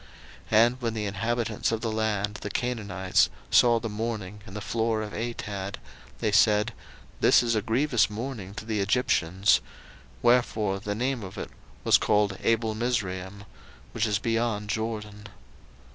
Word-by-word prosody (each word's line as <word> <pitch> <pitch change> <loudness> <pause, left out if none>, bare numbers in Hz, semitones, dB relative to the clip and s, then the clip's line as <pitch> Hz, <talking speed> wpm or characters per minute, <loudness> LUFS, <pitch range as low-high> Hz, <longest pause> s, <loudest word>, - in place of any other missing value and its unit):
01:050:011 - - -21 0.5
And 120 +2 0
when 115 -2 -1
the 105 -1 -2
inhabitants 115 +2 -1
of 115 -1 -1
the 115 - -1
land, 105 -1 -1
the 105 - -4
Canaanites, 100 -6 +1 0.2
saw 120 -1 +5
the 115 - -4
mourning 105 -2 -4
in 95 - -10
the - - -3
floor 110 +1 -1
of 105 - -7
Atad, 105 -4 -4 0.4
they 105 - 0
said, 105 +2 +4 0.5
This - - +5
is 115 -1 +1
a 110 - +1
grievous 120 +3 +2
mourning 105 -3 -6
to 110 - -7
the 110 -2 -1
Egyptians: 100 -3 +2 0.6
wherefore 110 -5 +2
the 105 +1 -3
name 125 +2 -1
of 95 -2 -8
it - - -6 0.3
was - - +5
called 105 -2 +1
Abelmizraim, 110 -4 -1 0.5
which 115 0 0
is 105 -1 +1
beyond 115 -2 -1
Jordan. 105 -2 -4
110 Hz, 150 wpm, -27 LUFS, 105-115 Hz, 0.6 s, saw